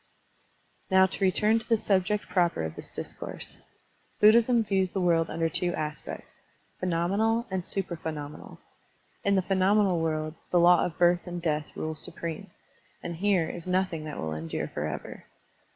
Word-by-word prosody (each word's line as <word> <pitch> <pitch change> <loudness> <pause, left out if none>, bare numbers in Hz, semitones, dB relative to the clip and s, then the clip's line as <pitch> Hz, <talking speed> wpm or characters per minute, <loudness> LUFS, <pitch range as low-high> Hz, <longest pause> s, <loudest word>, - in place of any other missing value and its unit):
Now 190 -1 +6
to 190 +1 -3
return 210 +4 +3
to 225 - -12
the 230 - +4
subject 205 0 0
proper 175 - +1
of 80 -1 -4
this - - -8
discourse. - - -5 0.6
Buddhism 230 +2 +6
views 190 -3 0
the 195 - -1
world 165 -2 +2
under 165 0 0
two 175 +3 0
aspects, 150 -1 -6 0.4
phenomenal 195 +7 +1
and 190 -1 -1
supra 185 -1 -2
phenomenal. 150 -2 -7 0.7
In 200 0 +3
the 190 - +2
phenomenal 195 -1 +3
world, 155 -1 -1 0.2
the 175 - +3
law 175 +1 +6
of 165 - -10
birth 175 +1 +3
and 175 0 -4
death 150 -3 -1
rules 155 0 -3
supreme, 165 -1 -5 0.5
and 170 -1 -5
here 190 -3 +2
is 175 0 -6
nothing 180 -3 0
that 150 - -6
will 80 -1 -3
endure 80 +1 -4
forever. - - -5
175 Hz, 155 wpm, -28 LUFS, 165-195 Hz, 0.7 s, Now